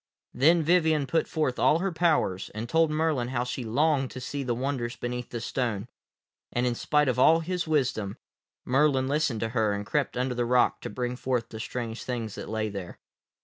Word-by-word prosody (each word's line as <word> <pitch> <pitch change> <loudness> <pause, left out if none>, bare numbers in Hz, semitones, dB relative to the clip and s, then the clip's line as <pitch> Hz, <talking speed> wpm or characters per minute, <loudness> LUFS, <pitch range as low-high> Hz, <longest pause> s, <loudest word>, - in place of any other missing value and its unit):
Then 160 +6 +4
Vivien 160 -3 +3
put 165 +4 0
forth 150 -5 -1
all 155 - +4
her 190 +3 -1
powers, 155 - +1
and 110 +2 -4
told 160 +4 +3
Merlin 155 -5 0
how 125 -1 -1
she 125 +1 -4
longed 135 +3 +1
to 130 - -8
see 140 +2 -4
the 125 -3 -1
wonders 125 -1 -2
beneath 125 0 -4
the 120 - -4
stone, 115 -3 -2 0.6
and, 120 +1 0
in 125 - +1
spite 150 +4 +1
of 125 -1 +1
all 165 +5 +6
his 180 +1 -2
wisdom, 130 -10 0 0.5
Merlin 135 0 +3
listened 140 -5 0
to 115 - -1
her 110 -3 +1
and 100 0 -4
crept 140 +1 -1
under 125 0 0
the 120 0 0
rock 125 +1 +2
to - - -5
bring 125 0 -3
forth 125 -2 -2
the 110 - -8
strange 115 0 -4
things 115 -4 -4
that - - -7
lay 110 0 -1
there. 100 -4 -7
125 Hz, 200 wpm, -27 LUFS, 120-150 Hz, 0.6 s, all